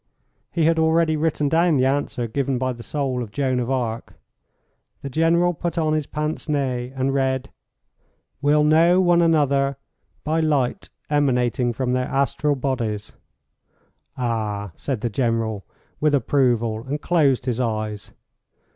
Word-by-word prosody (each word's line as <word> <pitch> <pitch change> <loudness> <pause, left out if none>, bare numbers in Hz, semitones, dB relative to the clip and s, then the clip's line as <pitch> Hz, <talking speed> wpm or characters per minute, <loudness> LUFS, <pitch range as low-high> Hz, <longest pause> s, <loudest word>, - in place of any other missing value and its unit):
He 165 -3 +1
had 165 0 +3
already 160 0 +3
written 150 -1 0
down 165 +1 +3
the 130 - +3
answer 135 -3 -1
given 135 +3 -1
by 130 0 -1
the 120 - -11
soul 130 -1 -2
of 110 -4 -6
Joan 130 0 0
of 120 0 -2
Arc. 120 -4 -2 0.9
The 140 - -5
General 170 +4 +2
put 170 +1 -4
on 155 -2 +1
his 155 -2 -1
pince 150 +1 -4
nez 130 -4 -1
and 135 +1 0
read, 130 -1 -1 0.9
"Will 150 +1 +3
know 165 +4 +5
one 175 -2 +4
another 140 -4 +2 0.5
by 155 +2 0
light 150 +1 0 0.2
emanating 125 -3 +1
from 125 +1 -2
their 125 0 0
astral 140 +2 0
bodies." 120 -6 -3 1.1
"Ah," 110 -5 -2
said 130 -6 -4
the 120 - -1
General, 115 -3 -1 0.4
with 150 -1 +3
approval, 120 -4 +1
and 145 +3 -2
closed 145 -7 +2
his 125 -2 -1
eyes. 110 -3 -3
135 Hz, 145 wpm, -22 LUFS, 120-155 Hz, 1.1 s, know